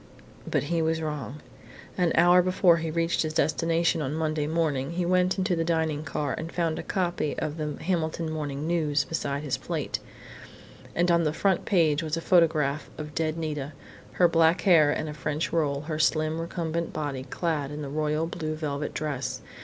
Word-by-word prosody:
But - - +1
he 165 +3 0
was 160 0 +1
wrong. 150 -2 -5 0.5
An 175 -3 +2
hour 175 +1 +6
before 180 -1 +4
he 165 -1 -3
reached 165 +1 0
his 155 -1 -2
destination 165 +1 +1
on 145 +2 -2
Sunday 155 -2 -1
morning 155 -3 0
he 175 0 -1
went 180 +1 +2
into 190 -1 +1
the 165 - 0
dining 160 -3 0
car 145 0 -2
and 165 +1 -6
found 165 -2 -1
a - - -2
copy 175 -5 -1
of 155 +1 -3
The 150 -2 -3
Hamilton 165 -2 -1
Morning 145 -2 -3
News 155 -4 +1
beside 140 -1 -3
his 140 -4 -1
plate. - - -3 1.0
And 175 +1 +3
on 170 0 +4
the 155 -1 0
front 190 +2 +1
page 160 -6 +3
was 160 0 -2
a - - -1
photograph 155 -5 +2
of 150 -1 -7
dead 160 0 -1
Nita, 150 -3 -3 0.4
her 175 - +5
black 165 +1 +3
hair 165 -7 +5
in 155 +1 -2
a 150 - -5
French 150 +3 -3
roll, 145 -4 +1
her 155 0 -4
slim, 155 0 +1
recumbent 170 0 -3
body 145 -4 -3
clad 155 -3 -2
in 150 +1 -6
the - - -4
royal 150 +2 0
blue 155 -2 -4
velvet 150 -2 -3
dress. 145 -4 -3
160 Hz, 185 wpm, -27 LUFS, 150-170 Hz, 1.0 s, hour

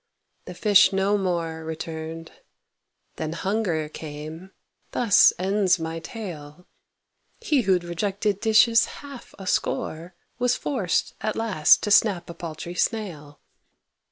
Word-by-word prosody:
The - - -9
fish 205 -2 +5
no 195 +1 +1
more 170 -4 -2
Returned. 160 0 -6 0.9
Then 155 0 -3
Hunger 180 -4 -1
came; 155 +3 -8 0.4
thus 230 -6 +5
ends 190 0 +2
my 165 0 -4
tale. 170 -5 -9 0.7
He 300 - +1
who'd 185 -4 +1
rejected 195 +3 -2
dishes 225 +1 +5
half 280 -3 -11
a 195 - -9
score, 170 -1 -2 0.2
Was 245 0 +2
forced, 215 - -1
at 215 - -2
last, 210 -9 +3
to 210 - -1
snap 190 -5 +3
a - - -9
paltry 170 0 -7
snail. 175 -8 -3
180 Hz, 120 wpm, -24 LUFS, 160-210 Hz, 0.9 s, fish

